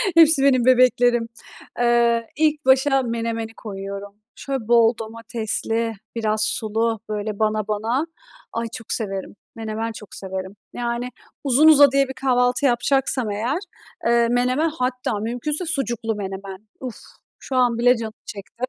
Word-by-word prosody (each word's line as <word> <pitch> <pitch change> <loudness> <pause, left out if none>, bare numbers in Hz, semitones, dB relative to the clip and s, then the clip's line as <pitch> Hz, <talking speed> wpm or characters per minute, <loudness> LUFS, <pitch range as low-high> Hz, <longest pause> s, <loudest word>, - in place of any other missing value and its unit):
Hepsi 320 -4 +7
benim 255 -3 +4
bebeklerim. 245 -2 +4 0.5
Iıı, 235 -1 +3
ilk 305 -1 +1
başa 270 +1 +4
menemeni 230 -1 -3
koyuyorum. 200 -1 -7 0.2
Şöyle 270 -5 -4
bol 235 -1 +5
domatesli, 225 0 -3 0.2
biraz 215 -1 0
sulu 225 +1 0
böyle 210 -1 -4
bana 215 -1 0
bana... 225 +7 -1 0.5
Ay, 230 0 -2
çok 225 - -9
severim, 195 -4 -4 0.2
menemen 225 0 -4
çok 210 -3 -9
severim. 190 0 -6 0.2
Yani, 240 0 -3 0.3
uzun 280 +3 +4
uzadıya 280 -3 +6
bir 265 - -6
kahvaltı 250 0 +1
yapacaksam 255 -2 +1
eğer, 230 +8 -1 0.5
eee, 235 0 +3
menemen 250 +6 +1
hatta 250 -7 -2
mümkünse 245 - -2
sucuklu 240 -8 -2
menemen. 195 0 -7
Uf, 255 -3 -6 0.4
şu 265 - -6
an 245 -2 +3
bile 245 +1 +4
canım 220 -1 -5
çekti. 210 +4 -10
235 Hz, 130 wpm, -22 LUFS, 220-255 Hz, 0.5 s, Hepsi